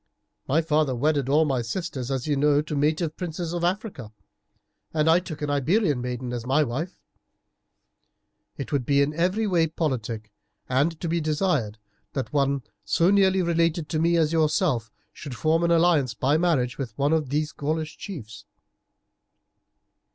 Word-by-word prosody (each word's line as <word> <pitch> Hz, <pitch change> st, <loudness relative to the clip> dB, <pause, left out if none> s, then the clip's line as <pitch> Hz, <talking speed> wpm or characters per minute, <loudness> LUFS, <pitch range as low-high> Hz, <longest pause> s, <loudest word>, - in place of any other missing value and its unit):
My 160 Hz, +5 st, +2 dB
father 150 Hz, -4 st, +1 dB
wedded 140 Hz, +1 st, +1 dB
all 155 Hz, +3 st, +4 dB
my 135 Hz, -4 st, 0 dB
sisters, 130 Hz, 0 st, -4 dB
as 130 Hz, -2 st, -2 dB
you 150 Hz, -2 st, +1 dB
know, 145 Hz, +1 st, +3 dB
to 150 Hz, 0 st, -4 dB
native 155 Hz, +2 st, 0 dB
princes 170 Hz, -1 st, -4 dB
in 175 Hz, -1 st, -2 dB
Africa, 180 Hz, -, -2 dB, 0.8 s
and 155 Hz, 0 st, +2 dB
I 165 Hz, +2 st, +6 dB
took 155 Hz, -5 st, -7 dB
an 145 Hz, -, -1 dB
Iberian 145 Hz, -, +1 dB
maiden 125 Hz, 0 st, -4 dB
as 120 Hz, -2 st, -4 dB
my 135 Hz, +5 st, +2 dB
wife. 150 Hz, +8 st, -4 dB, 1.6 s
It 140 Hz, -, -6 dB
would 140 Hz, -4 st, +1 dB
be 140 Hz, +2 st, +3 dB
in 145 Hz, +2 st, -1 dB
every 185 Hz, +7 st, +1 dB
way 175 Hz, -5 st, +2 dB
politic 115 Hz, -9 st, -3 dB, 0.4 s
and 145 Hz, +6 st, +1 dB
to 170 Hz, -, -2 dB
be 170 Hz, +1 st, 0 dB
desired 150 Hz, -, 0 dB, 0.4 s
that 135 Hz, +1 st, -4 dB
one 140 Hz, -2 st, +1 dB, 0.2 s
so 165 Hz, -, +2 dB
nearly 190 Hz, -2 st, +4 dB
related 170 Hz, -2 st, +1 dB
to 155 Hz, -, -1 dB
me 170 Hz, +1 st, +3 dB
as 160 Hz, -1 st, +2 dB
yourself 155 Hz, -, +1 dB, 0.2 s
should 140 Hz, -5 st, -8 dB
form 155 Hz, +8 st, +1 dB
an 170 Hz, -, +2 dB
alliance 165 Hz, -8 st, +3 dB
by 135 Hz, +5 st, +1 dB
marriage 150 Hz, -8 st, +1 dB
with 120 Hz, -5 st, -5 dB
one 145 Hz, +3 st, +2 dB
of 155 Hz, -4 st, 0 dB
these 150 Hz, +2 st, -1 dB
Gaulish 155 Hz, +2 st, -3 dB
chiefs." 115 Hz, -, -9 dB
150 Hz, 165 wpm, -25 LUFS, 135-165 Hz, 1.6 s, I